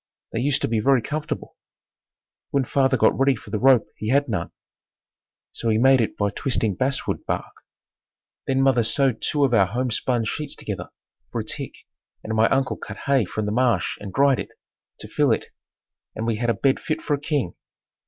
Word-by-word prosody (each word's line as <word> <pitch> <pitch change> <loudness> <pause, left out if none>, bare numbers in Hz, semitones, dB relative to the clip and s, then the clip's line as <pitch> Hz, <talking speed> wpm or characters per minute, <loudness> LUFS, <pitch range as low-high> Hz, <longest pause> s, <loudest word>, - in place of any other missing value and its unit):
They 115 - -1
used 140 +3 +1
to - - +2
be 110 -1 0
very 135 +3 +4
comfortable. 150 +4 -4 0.9
When 140 -2 +1
father 135 0 +2
got 110 - +4
ready 135 0 +4
for - - -12
the 110 - -1
rope 130 -1 +5
he 110 - -4
had 140 +3 +3
none, 100 -8 -2 1.0
so 115 - -3
he 110 - +3
made 130 +2 +5
it 110 - -2
by 100 -1 0
twisting 110 -2 0
basswood 130 +8 -1
bark. - - -3 0.9
Then 135 0 +2
mother 130 -3 +4
sewed 130 +1 +1
two 145 -2 +2
of 130 - 0
our 100 -5 +5
home 125 +5 -2
spun 120 0 0
sheets 150 +6 -4
together - - -6 0.4
for - - -2
a - - -8
tick - - -5 0.5
and 110 - -4
my 110 +1 +4
uncle 135 0 +1
cut - - -8
hay 135 -5 +3
from 105 +4 -3
the 105 - -1
marsh 120 -5 +1
and 100 -2 -6
dried 140 +1 +3
it, - - -5 0.5
to - - -8
fill - - +2
it - - -1 0.7
and 110 - -3
we 115 -2 0
had 120 +1 -1
a 115 - +2
bed 135 -1 +2
fit 155 0 -3
for 150 - 0
a 145 - 0
king. 145 - -1
125 Hz, 200 wpm, -23 LUFS, 110-135 Hz, 1.0 s, rope